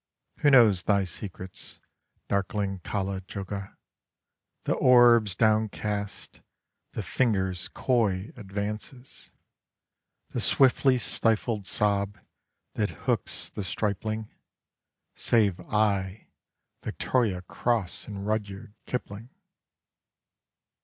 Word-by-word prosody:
(Who 145 - +4
knows 115 -9 +6
thy 100 0 +2
secrets, 95 0 -8 0.5
darkling 100 -1 -1
Kala 95 0 -3
juggah 100 +1 -6 0.9
The - - +1
orbs 120 -6 +6
downcast, 105 -1 -1 0.5
the - - -3
fingers' 95 -7 0
coy 110 -6 0
advances, 105 +5 -6 1.0
The - - -2
swiftly 135 -1 +4
stifled 110 -2 0
sob 100 -1 +1 0.6
that - - 0 0.2
hooks - - 0
the 105 - -6
stripling 110 +3 -3 0.8
Save 105 -6 +2
I, 100 -2 0 0.5
Victoria 105 -8 -1
Cross, 110 0 -2
and 100 -2 -6
Rudyard 105 0 -3
Kipling!) 115 -1 -5
105 Hz, 85 wpm, -27 LUFS, 100-115 Hz, 1.0 s, knows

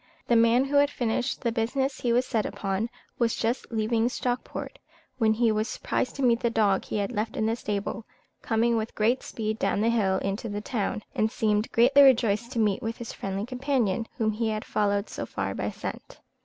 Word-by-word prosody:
The 240 - +3
man, 230 +3 +5
who 285 +1 +1
had 285 0 +5
finished 245 -1 -1
the 235 - 0
business 260 +4 -1
he 240 - +1
was 245 +2 +3
sent 225 -5 0
upon, 195 +3 -2 0.3
was 235 -2 +2
just 235 +3 -1
leaving 225 +1 +1
Stockport, 250 0 -4 0.4
when 220 -2 +4
he 230 0 +2
was 215 +1 0
surprised 250 - -2
to 275 - -3
meet 235 -2 +4
the 235 - +1
dog 210 -4 +2
he - - -3
had 200 +1 -1
left 220 -1 -3
in 220 - +1
the 225 +1 +1
stable, 210 0 -3 0.4
coming 230 +1 +1
with 220 +1 -3
great 235 +4 +2
speed 220 0 -4
down - - +1
the 225 - +3
hill 195 -5 +2
into 195 +4 -3
the 205 0 -3
town, 215 -1 -2
and 220 0 +1
seemed 215 -2 0
greatly 255 +5 +6
rejoiced 235 -4 +4
to - - -5
meet 215 0 +2
with 225 -1 -3
his 235 - -7
friendly 195 +1 -3
companion, 250 -4 0
whom 220 -1 +1
he 220 +1 -1
had 215 0 -3
followed 205 0 0
so - - -6
far - - -3
by - - -2
scent. - - -7
225 Hz, 210 wpm, -27 LUFS, 215-245 Hz, 0.4 s, greatly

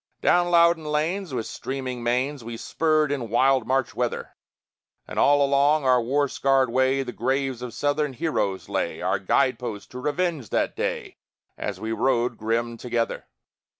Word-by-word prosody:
Down 175 0 +4
Loudon 170 -2 +4
Lanes, 160 +5 -1
with 120 -4 -3
streaming 130 -2 -5
manes, 125 +3 -1
We 115 0 -6
spurred 155 +2 +1
in 125 -6 -3
wild 130 +1 +3
March 130 -1 0
weather; - - -3 0.7
And - - -4
all 145 0 +5
along 140 +1 +3
our 125 -1 +4
war 140 +5 +1
scarred 135 -2 +2
way 130 +2 +2
The 125 - -6
graves 130 +1 -1
of 125 -1 -5
Southern 145 +3 -1
heroes 115 - -2
lay, - - -2
Our 95 +1 +1
guide 125 +5 +1
posts 110 -5 -5
to 125 - -8
revenge 150 - -1
that - - 0
day, - - -3 0.4
As - - -5
we 110 0 -4
rode 120 +1 +1
grim 115 +2 -2
together. 120 -1 -2
130 Hz, 160 wpm, -24 LUFS, 120-145 Hz, 0.7 s, all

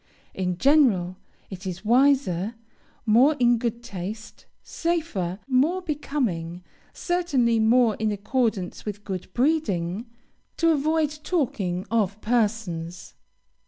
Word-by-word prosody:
In 180 -2 -2
general, 220 - +3 0.3
it 190 0 -7
is 185 +3 -6
wiser, 240 -5 +3 0.5
more 245 +8 +5
in 240 -1 +4
good 235 0 -3
taste, 215 0 -7 0.2
safer, 315 - -2
more 275 +8 +2
becoming, 235 - -3 0.3
certainly 285 -11 +1
more 230 +1 +4
in 215 -1 0
accordance 210 -2 -1
with 205 -1 -6
good 190 -2 -6
breeding, 230 - 0 0.5
to 330 -1 +3
avoid 305 0 0
talking 195 - -1
of 210 -3 0
persons. 205 -7 -2
225 Hz, 105 wpm, -25 LUFS, 190-275 Hz, 0.5 s, more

